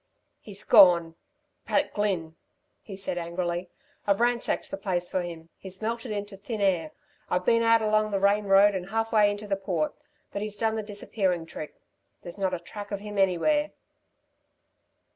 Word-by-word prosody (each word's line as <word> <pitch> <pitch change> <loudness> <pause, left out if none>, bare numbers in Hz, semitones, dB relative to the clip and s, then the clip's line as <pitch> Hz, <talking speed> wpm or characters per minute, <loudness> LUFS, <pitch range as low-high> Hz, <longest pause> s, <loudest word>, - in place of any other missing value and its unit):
"He's 205 -1 -6
gone 175 -6 +6 0.5
Pat - - +1
Glynn!" 185 -6 -1 0.5
he 200 - -9
said 190 -2 -3
angrily. 175 +1 -3 0.4
"I've 200 -1 +3
ransacked 240 +4 0
the 290 - -3
place 180 -6 -1
for 185 - -1
him. 165 -2 -8
He's 190 -1 -9
melted 230 +2 -3
into 205 -1 -5
thin 215 +3 -5
air. 180 -6 +1 0.4
I've 180 0 0
been 230 0 +4
out 230 -1 +4
along 215 0 +2
the 200 -2 0
Rane 200 +1 +3
road 200 +1 +6
and 190 -1 -4
half 225 +1 -1
way 210 -2 +5
into 205 +1 -4
the 195 -1 0
Port; 180 -6 -1 0.4
but 200 - -4
he's 210 -1 -4
done 220 +1 0
the 220 - -1
disappearing 200 -4 -2
trick. 155 -2 -9 0.4
There's 175 +3 -9
not 190 -1 +1
a - - -6
track 205 +4 -9
of 200 - -3
him 210 -1 -5
anywhere." 295 - +2
200 Hz, 175 wpm, -27 LUFS, 180-215 Hz, 0.5 s, gone